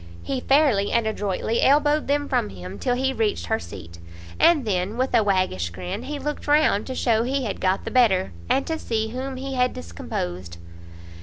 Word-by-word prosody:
he 265 -2 -3
fairly 270 -9 +3
and 235 -1 +2
adroitly 215 +1 -1
elbowed 295 +2 +3
them 290 +1 +1
from 105 - 0
him 95 0 -9
till 245 - 0
he 265 +1 0
reached 215 - -1
her - - 0
seat; 85 -1 -10 0.4
and 310 -7 +5
then, 195 +1 -1
with 260 +1 -1
a 235 - +5
waggish 185 - 0
grin, 90 +1 -5
he 295 +1 -4
looked 295 +1 -5
round, 290 -8 +3
to 260 - -4
show 225 -3 +2
he 265 +3 -1
had 205 - -4
got 185 +1 +1
the - - -4
better, 215 -8 +3 0.2
and 270 - +2
to 320 -1 -3
see 220 -1 -2
whom 260 +3 -5
he 270 +1 -5
had 250 -1 +1
discomposed. 85 +1 -5
225 Hz, 190 wpm, -24 LUFS, 180-270 Hz, 0.4 s, and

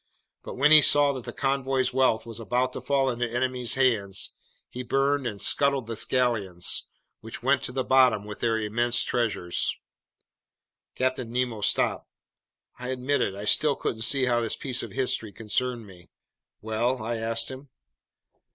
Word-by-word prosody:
But - - -8
when 145 +3 +4
he 155 -1 +10
saw 145 -1 +4
that 130 -3 -7
the - - -5
convoy's 135 -1 0
wealth 130 -4 +2
was 115 -1 -8
about 125 +3 -1
to - - -5
fall 135 -2 +1
into 120 -1 -3
enemy 125 0 -2
hands, 110 -7 +1 0.3
he 125 - -7
burned 135 +1 0
and 105 -3 -5
scuttled 140 0 +1
the 115 -1 -6
galleons, 110 -9 0 0.3
which 115 +1 -9
went 135 +1 +2
to - - -3
the 130 0 -2
bottom 125 -6 +3
with 105 0 -8
their 115 -1 +1
immense 120 +3 +1
treasures." 100 -7 -1 1.2
Captain 130 -2 -2
Nemo 120 -3 -2
stopped. - - 0 0.7
I 125 - -6
admit 130 +2 -1
it: 95 - -1
I 100 +1 -7
still 145 +6 +3
couldn't 110 - -4
see 130 +4 +3
how 120 -1 +1
this 115 - -1
piece 130 -2 -1
of - - -7
history 125 -5 -1
concerned 115 +3 -2
me. 90 -4 -15 0.5
"Well?" 115 +3 -1
I 115 +1 -2
asked 115 +2 -1
him. 130 +1 -10
125 Hz, 165 wpm, -26 LUFS, 110-130 Hz, 1.2 s, he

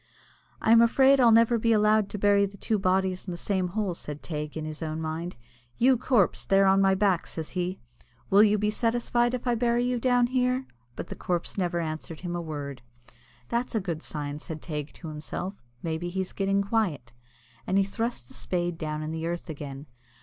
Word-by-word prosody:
"I 220 - +2
am 230 0 +8
afraid 265 +4 +5
I'll 240 -3 +6
never 230 +1 +5
be 230 +1 +3
allowed 210 -1 +3
to - - -5
bury 200 0 +4
the 200 +1 -13
two 215 +1 0
bodies 185 0 0
in - - -3
the 175 - -5
same 190 0 -1
hole," 195 0 -2
said 150 -3 -7
Teig, 150 -1 -5
in 155 - -4
his 155 +1 -6
own 155 0 -3
mind. 160 +2 -4 0.4
"You 260 +2 +5
corpse, 240 -5 +2
there 195 0 +4
on 195 0 +5
my 195 0 +4
back," 190 -3 +1
says 160 -2 -6
he, 180 +1 -2 0.5
"will 200 +2 +7
you 210 0 +5
be 210 +1 +1
satisfied 240 +2 +1
if 250 - -6
I 245 - +2
bury 235 +1 +1
you 245 0 0
down 245 0 +3
here?" 255 +1 0 0.3
But - - -6
the - - -5
corpse 175 -2 -2
never 175 -3 0
answered 155 -1 -5
him 175 -1 -4
a 175 - -2
word. 145 -5 -6 0.7
"That's 235 0 -1
a - - +3
good 170 -5 -4
sign," 145 -2 -5
said 155 0 -7
Teig 150 -2 -5
to 165 - -9
himself. 175 +5 -5 0.2
"Maybe 165 +1 -2
he's 190 +1 -3
getting 195 0 +1
quiet," 185 - -1 0.5
and 190 - +2
he 195 - +5
thrust 200 - -3
the - - -12
spade 175 -2 -2
down 155 -1 -3
in 155 - -4
the 160 0 -3
earth 170 0 -4
again. 140 -1 -7
190 Hz, 210 wpm, -27 LUFS, 160-225 Hz, 0.7 s, am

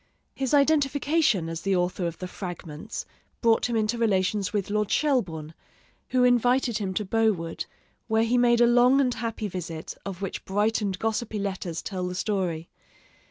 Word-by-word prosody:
His 265 -2 -2
identification 285 - +2
as 165 0 -4
the 195 +1 +1
author 180 0 0
of 170 - -5
the 185 - -5
'Fragments' 175 +1 -7 0.3
brought 230 0 +3
him 235 - -1
into 220 +1 0
relations 200 -2 +1
with 205 -2 -2
Lord 210 -1 0
Shelburne, 175 - 0 0.6
who 255 -1 +3
invited 245 -1 +3
him 195 -2 -2
to 210 - -1
Bowood, 195 -6 0 0.4
where 220 0 +2
he 230 +2 +1
made 240 -1 +4
a - - +8
long 245 +3 +5
and 255 -3 +2
happy 225 -3 -3
visit, 170 -4 -6
of 195 -3 -6
which 195 - -4
bright 210 +3 +1
and 195 -3 -1
gossipy 220 +1 -2
letters 190 -4 -3
tell 185 -2 -3
the 180 - -4
story. 180 -5 -1
210 Hz, 165 wpm, -26 LUFS, 185-240 Hz, 0.6 s, a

